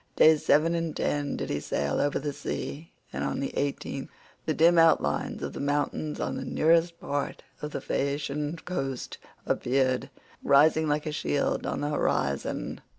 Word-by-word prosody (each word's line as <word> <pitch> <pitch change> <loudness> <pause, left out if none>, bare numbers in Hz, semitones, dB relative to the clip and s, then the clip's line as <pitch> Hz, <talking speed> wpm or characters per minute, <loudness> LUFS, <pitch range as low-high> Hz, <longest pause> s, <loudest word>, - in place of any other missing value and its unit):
Days 155 -1 +6
seven 160 +3 +4
and 165 -2 -2
ten 145 -1 -1
did - - -3
he 75 - 0
sail 70 -1 -1
over 145 - +1
the 145 0 -3
sea, 155 +3 -5 0.2
and - - -2
on - - -1
the 140 - -3
eighteenth 140 -1 -3 0.4
the 155 - +2
dim 170 +1 +5
outlines 165 0 +2
of - - -4
the - - -6
mountains 145 +1 -1
on - - -2
the - - -4
nearest 170 +1 +2
part 145 0 -3 0.2
of 150 - -3
the - - -5
Phaeacian 145 +2 -2
coast 135 -8 -4 0.3
appeared, 130 +1 +1 0.3
rising 155 +3 +5
like 150 0 0
a 155 - -2
shield 150 -1 -1
on - - -2
the 145 - -1
horizon. 70 - -1
145 Hz, 165 wpm, -28 LUFS, 140-160 Hz, 0.4 s, Days